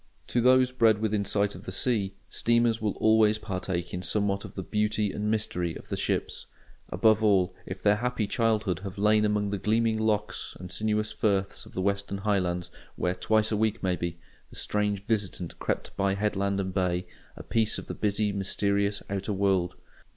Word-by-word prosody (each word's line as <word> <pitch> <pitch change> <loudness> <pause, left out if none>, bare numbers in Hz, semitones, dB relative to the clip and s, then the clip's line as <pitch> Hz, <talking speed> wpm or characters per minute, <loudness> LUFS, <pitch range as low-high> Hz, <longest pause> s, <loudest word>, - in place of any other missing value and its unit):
To 120 - +2
those 130 +1 +5
bred 115 -4 +4
within 105 -1 0
sight 100 +1 +1
of - - -11
the - - -5
sea, 100 -2 0
steamers 115 -1 +2
will 105 -2 0
always 110 -1 +4
partake 90 -4 -4
in 90 - -3
somewhat 100 +2 0
of - - -10
the 95 - -4
"beauty 105 0 0
and 105 +1 -2
mystery 90 -6 -1
of - - -11
the - - -1
ships"; - - -2 0.4
above 110 +4 +3
all, 95 -3 +3
if 95 +1 -7
their 105 0 +4
happy 120 -1 -1
childhood 105 -4 0
have 100 +1 -7
lain 105 +1 +4
among 105 -1 0
the 100 - -2
gleaming 110 +2 +1
lochs 105 -1 -1
and 90 0 -8
sinuous 105 +1 0
firths 100 -3 -1
of - - -15
the 95 - -1
Western 100 0 -1
Highlands, 95 -4 -1 0.2
where, 90 - 0
twice 110 +3 +1
a - - +2
week 110 +1 0
maybe, 85 -2 -1 0.3
the - - -14
strange 105 -1 -1
visitant 100 -6 -2
crept - - -3
by 100 0 +1
headland 100 -1 0
and 95 -1 -2
bay, 90 -1 0 0.3
a - - -8
piece 110 -2 +1
of - - -6
the - - -5
busy, 105 0 0
mysterious 100 +1 0
outer 100 +1 -2
world. 95 -2 +1
105 Hz, 185 wpm, -28 LUFS, 95-110 Hz, 0.4 s, those